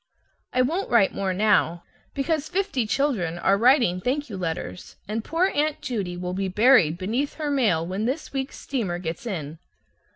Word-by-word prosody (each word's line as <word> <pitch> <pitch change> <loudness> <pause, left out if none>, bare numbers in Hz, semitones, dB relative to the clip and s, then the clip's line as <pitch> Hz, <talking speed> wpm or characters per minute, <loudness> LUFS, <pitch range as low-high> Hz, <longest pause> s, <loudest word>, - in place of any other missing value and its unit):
I 255 - +3
won't 335 +10 -1
write 225 -5 +4
more 195 -1 -1
now, 185 -4 +2 0.3
because 305 +2 -1
fifty 360 - -1
children 210 - 0
are 195 +3 +3
writing 235 -5 +4
thank 270 +3 -2
you - - -4
letters, 160 - -5
and 215 +2 -3
poor 340 +8 +1
Aunt 300 +1 0
Judy 195 -8 -3
will 180 0 -4
be 195 +1 -1
buried 195 - +4
beneath 230 +10 -2
her 300 -2 -2
mail 210 - +2
when 190 +5 -3
this 275 +6 -3
week's 270 0 -3
steamer 215 -11 -2
gets 170 +5 -5
in. 160 -6 -5
220 Hz, 170 wpm, -24 LUFS, 180-275 Hz, 0.3 s, write